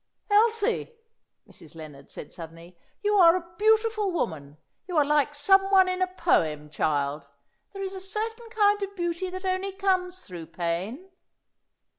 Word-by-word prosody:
"Elsie," 455 +2 +2 0.5
Mrs. 160 0 -15
Lennard 150 -4 -11
said - - -9
suddenly, 165 +1 -11 0.3
"you 415 0 +2
are 340 -2 +7
a 340 -1 -6
beautiful 435 -1 +2
woman. 150 - -4 0.3
You 355 -3 -2
are 295 - +5
like 295 0 +1
some 385 +6 +4
one 380 -1 +6
in 370 0 -2
a 370 - +3
poem, 155 - 0
child! 145 -1 -1 0.4
There 390 -1 -6
is 385 0 -4
a 380 - -7
certain 450 +4 -4
kind 415 -2 +2
of 400 0 -4
beauty 345 0 -2
that 370 +1 -7
only 375 +1 -1
comes 370 -2 -1
through 170 -3 -9
pain." 180 - -4
365 Hz, 155 wpm, -26 LUFS, -, 0.5 s, are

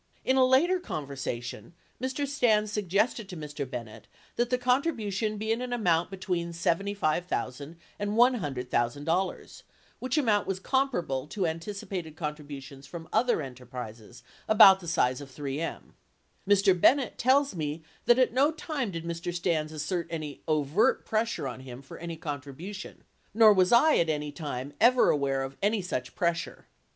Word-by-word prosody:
In 260 - +3
a 260 - +5
later 295 +9 +4
conversation 140 - -5 0.3
Mr. 260 +3 -1
Stans 220 -6 +2
suggested 210 +2 0
to 180 - -7
Mr. 150 -3 -5
Bennett 115 -4 -8 0.3
that 240 0 0
the 250 - +2
contribution 240 - 0
be 220 +1 -2
in 230 +2 0
an 250 -1 -4
amount 175 -8 +1
between 180 -3 -3
$75,000 170 - -1 0.2
and 205 0 -2
$100,000, 150 - 0 0.4
which 255 +4 -2
amount 215 -9 +2
was 195 -1 -2
comparable 190 - 0
to 190 +3 -2
anticipated 165 -1 -4
contributions 145 -3 -7
from 165 0 -8
other 240 -10 +2
enterprises 125 -3 -9 0.2
about 200 -3 +8
the 175 - -10
size 130 -5 +1
of 140 - -9
3M. 145 +3 -5 0.6
Mr. 200 -1 +5
Bennett 275 -1 +4
tells 275 +3 +3
me 155 -1 -4 0.2
that 240 - +6
at 255 -3 +3
no 275 +4 +4
time 305 -6 -3
did 165 -3 -6
Mr. 170 +1 -3
Stans 170 -3 -1
assert 160 +3 -3
any 155 -4 -5
overt 155 +5 +2
pressure 220 -9 -1
on 130 - -6
him 130 -1 -9
for 135 - -11
any 170 -1 -6
contribution 150 +7 -7 0.3
nor 220 -2 +8
was 185 -2 +3
I 300 +7 +6
at 165 - +2
any 150 -1 -2
time 140 -3 -5
ever 245 +2 +6
aware 135 -2 0
of 135 0 -7
any 205 0 +1
such 130 -8 -4
pressure. 170 -1 -2
170 Hz, 150 wpm, -28 LUFS, 145-220 Hz, 0.6 s, about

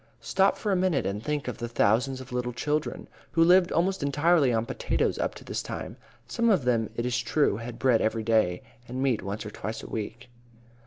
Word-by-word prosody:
Stop 195 0 +2
for 210 - -2
a - - +3
minute 180 -5 +1
and 100 +2 -2
think 150 -1 -2
of 125 - -4
the 120 - -3
thousands 120 +4 +1
of 130 -1 -10
little 125 0 -2
children 150 +5 -2 0.3
who 165 - +5
lived 180 +1 +5
almost 185 +2 +1
entirely 145 0 +3
on 115 -1 0
potatoes - - -1
up - - -1
to - - -11
this - - -3
time. - - -6 0.3
Some 235 - +1
of 190 - +3
them, 115 -3 +1
it 115 - -2
is 125 0 0
true, 125 -3 +1
had 115 +1 -7
bread 125 -3 +3
every 110 0 0
day, 110 -6 +2 0.2
and 130 +2 -3
meat 130 -5 +1
once 100 +3 -5
or 105 - -6
twice 110 +1 -6
a - - -8
week. 115 +3 -6
125 Hz, 215 wpm, -27 LUFS, 115-150 Hz, 0.3 s, who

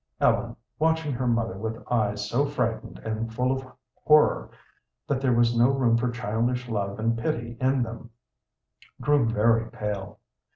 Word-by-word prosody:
Ellen, - - +2 0.2
watching 160 -1 +1
her 125 +1 -2
mother 115 -3 0
with 110 +1 -3
eyes 105 -3 0
so 120 +7 +1
frightened 125 -5 -2
and 110 +1 -3
full 125 +3 0
of 130 0 -2 0.4
horror 150 0 +4 0.6
that 135 -2 -1
there 130 -2 +2
was 120 0 +3
no 120 +2 +5
room 130 -4 +2
for 120 +1 +1
childish 120 +2 -1
love 100 -3 -2
and 115 +1 0
pity 115 0 -2
in 130 0 +2
them, 115 0 -8 0.9
grew 140 -2 +3
very 115 +1 +2
pale. 105 -2 -5
115 Hz, 155 wpm, -26 LUFS, 110-130 Hz, 0.9 s, no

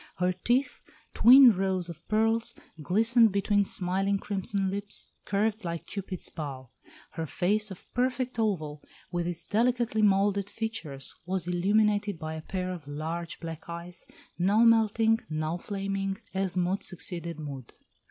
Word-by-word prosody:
Her 180 0 +1
teeth, 240 +9 0 0.3
twin 255 +2 +9
rows 190 -1 0
of 170 -1 -9
pearls, 225 +2 +1 0.3
glistened 225 - +4
between 200 +1 +2
smiling 195 +1 0
crimson 195 -1 -2
lips, 200 +1 -2 0.2
curved 215 +2 0
like 170 -1 -4
Cupid's 190 -3 -5
bow. 135 -5 -7 0.4
Her 165 -1 -4
face 210 +7 +1
of 190 - -10
perfect 255 0 -1
oval, 155 -9 -1 0.3
with 175 -1 -1
its 175 -2 -4
delicately 235 0 +1
moulded 200 -1 +3
features, 205 -12 -4
was 185 -2 -2
illuminated 205 +2 +2
by 160 -1 -5
a 160 - -6
pair 185 +2 -3
of 165 -5 -9
large 160 +4 -5
black 165 0 -8
eyes, 170 +1 -8 0.3
now 200 +6 +4
melting, 225 0 +4
now 155 +2 -2
flaming, 195 0 -3 0.2
as 190 -1 -1
mood 180 +2 +1
succeeded 170 -2 -3
mood. 140 -5 -7
195 Hz, 140 wpm, -28 LUFS, 170-215 Hz, 0.4 s, twin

